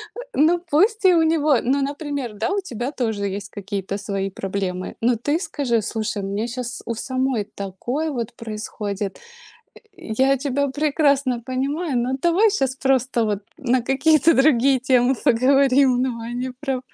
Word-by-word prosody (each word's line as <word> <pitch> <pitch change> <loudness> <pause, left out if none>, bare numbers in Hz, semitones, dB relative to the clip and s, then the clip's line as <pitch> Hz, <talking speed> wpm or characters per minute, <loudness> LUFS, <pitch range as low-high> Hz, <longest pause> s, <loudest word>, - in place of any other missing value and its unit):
Э, 485 - -6
ну 335 +4 +3
пусть 400 +7 +2
и 365 - +7
у 330 - +4
него. 310 -4 +3
Ну 275 +3 +1
например, 285 -4 -3
да, 365 - -1
у 400 - +1
тебя 245 - -4
тоже 220 -7 -2
есть 200 +1 -5
какие-то 200 -1 -4
свои 195 -1 -3
проблемы. 190 -1 -4
Но 240 +1 +3
ты 290 +8 -1
скажи: 275 - -1
"Слушай, 215 -1 -3
у - - -3
меня 205 +4 -2
щас 245 0 -5
у 230 - -3
самой 255 -3 -1
такое 240 +11 -3
вот 235 -4 -4
происходит. 210 -3 -5 0.7
Я 265 - 0
тебя 280 +1 -1
прекрасно 280 -3 +1
понимаю, 270 +3 -1
но 250 +2 0
давай 365 +6 +4
щас 270 - 0
просто, 260 -3 +1
вот, 210 -2 0 0.2
на 255 -3 +1
какие-то 310 +5 +4
другие 270 -2 +4
темы 255 0 +3
поговорим". 260 +1 +4
Давай 235 -2 -3
не 255 +1 -3
про 270 -3 -2
255 Hz, 160 wpm, -22 LUFS, 225-285 Hz, 0.7 s, и